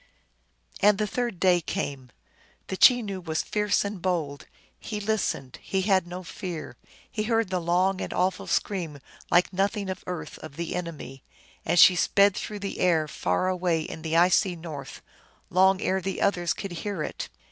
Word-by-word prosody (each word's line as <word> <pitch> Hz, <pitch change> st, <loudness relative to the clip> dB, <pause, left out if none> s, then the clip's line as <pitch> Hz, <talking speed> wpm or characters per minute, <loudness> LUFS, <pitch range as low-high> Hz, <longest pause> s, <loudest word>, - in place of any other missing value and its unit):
And 205 Hz, 0 st, +5 dB
the 215 Hz, -, 0 dB
third 235 Hz, -2 st, -3 dB
day 180 Hz, -2 st, +4 dB
came. 135 Hz, -4 st, -4 dB, 0.6 s
The 190 Hz, -, -2 dB
Chenoo 210 Hz, -3 st, +4 dB
was 160 Hz, -2 st, -2 dB
fierce 210 Hz, -1 st, +1 dB
and 200 Hz, -3 st, -5 dB
bold; 160 Hz, -6 st, -2 dB, 0.3 s
he 210 Hz, -2 st, -5 dB
listened; 200 Hz, -, -2 dB
he 190 Hz, -1 st, -1 dB
had 190 Hz, -3 st, +2 dB
no 180 Hz, +1 st, -7 dB
fear. 175 Hz, -2 st, -6 dB, 0.4 s
He 215 Hz, -, -2 dB
heard 225 Hz, -3 st, +1 dB
the 185 Hz, -, +1 dB
long 180 Hz, +3 st, +1 dB
and -, -, -4 dB
awful 185 Hz, +1 st, 0 dB
scream 170 Hz, -7 st, -1 dB, 0.3 s
like 180 Hz, +2 st, +3 dB
nothing 195 Hz, +1 st, 0 dB
of 185 Hz, -, -7 dB
earth 180 Hz, -2 st, -5 dB
of 155 Hz, -3 st, -10 dB
the 170 Hz, +1 st, -4 dB
enemy, 160 Hz, -6 st, -6 dB, 0.4 s
as 170 Hz, +2 st, +2 dB
she 180 Hz, +1 st, +8 dB
sped 200 Hz, +2 st, +4 dB
through 210 Hz, -, -5 dB
the 200 Hz, -, -4 dB
air 165 Hz, -4 st, +3 dB
far 90 Hz, -, -1 dB
away 180 Hz, -3 st, +1 dB
in 160 Hz, 0 st, -7 dB
the 160 Hz, +1 st, 0 dB
icy 180 Hz, +2 st, +4 dB
north, 160 Hz, -4 st, -8 dB, 0.5 s
long 190 Hz, +1 st, +4 dB
ere 190 Hz, 0 st, 0 dB
the 190 Hz, +1 st, -3 dB
others 175 Hz, -4 st, +1 dB
could 195 Hz, -, -6 dB
hear 180 Hz, -1 st, -3 dB
it. -, -, -5 dB
185 Hz, 170 wpm, -26 LUFS, 165-200 Hz, 0.6 s, she